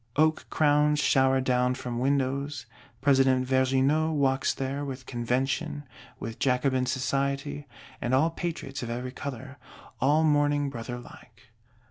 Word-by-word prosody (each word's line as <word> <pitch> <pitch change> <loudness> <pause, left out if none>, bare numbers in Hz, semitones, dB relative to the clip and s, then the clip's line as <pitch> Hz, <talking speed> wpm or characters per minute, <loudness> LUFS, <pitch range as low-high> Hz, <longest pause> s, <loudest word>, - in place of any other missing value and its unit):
Oak 155 +1 +2
crowns 150 0 +3
shower 135 -2 +3
down 125 0 +1
from 125 -2 -4
windows; 140 +1 -1 0.4
President 135 -2 +4
Vergniaud 135 +4 +2
walks 135 -2 +2
there, 135 +2 -3
with 135 -2 -6
Convention, 135 +5 -2 0.4
with 115 -1 -6
Jacobin 130 0 +1
Society, 140 +2 -2 0.3
and 120 - -1
all 160 +5 +3
Patriots 160 -5 -5
of 120 - -5
every 125 +2 -4
color, 130 0 -7 0.4
all 150 +4 +3
mourning 145 -2 +2
brother 120 -1 -6
like. 120 0 -15
135 Hz, 125 wpm, -27 LUFS, 130-145 Hz, 0.4 s, President